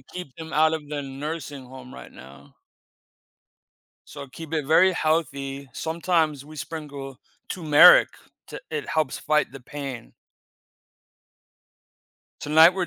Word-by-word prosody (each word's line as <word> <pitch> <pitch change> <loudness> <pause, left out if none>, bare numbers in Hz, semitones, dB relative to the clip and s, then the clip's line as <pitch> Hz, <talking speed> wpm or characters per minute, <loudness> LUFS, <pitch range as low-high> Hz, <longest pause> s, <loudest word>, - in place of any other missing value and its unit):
keep 180 -7 -10
them 160 -1 -9
out 155 +1 +3
of 150 -2 -4
the 145 -1 -4
nursing 145 0 -6
home 130 0 -12
right - - -12
now. 65 +2 -15 1.5
So 140 -1 -10
keep 160 +4 -11
it 150 -4 -1
very 185 +4 +5
healthy. 140 -4 -2
Sometimes 160 -3 -1
we 155 +1 -13
sprinkle 140 -4 -7 0.3
turmeric 170 - +7 0.4
to - - -8
it 450 -1 -4
helps 155 -5 -1
fight 150 0 0
the 135 - -10
pain. 135 -3 -8 2.3
Tonight 160 +4 +6
we're 185 -2 -1
150 Hz, 120 wpm, -24 LUFS, 135-160 Hz, 2.3 s, turmeric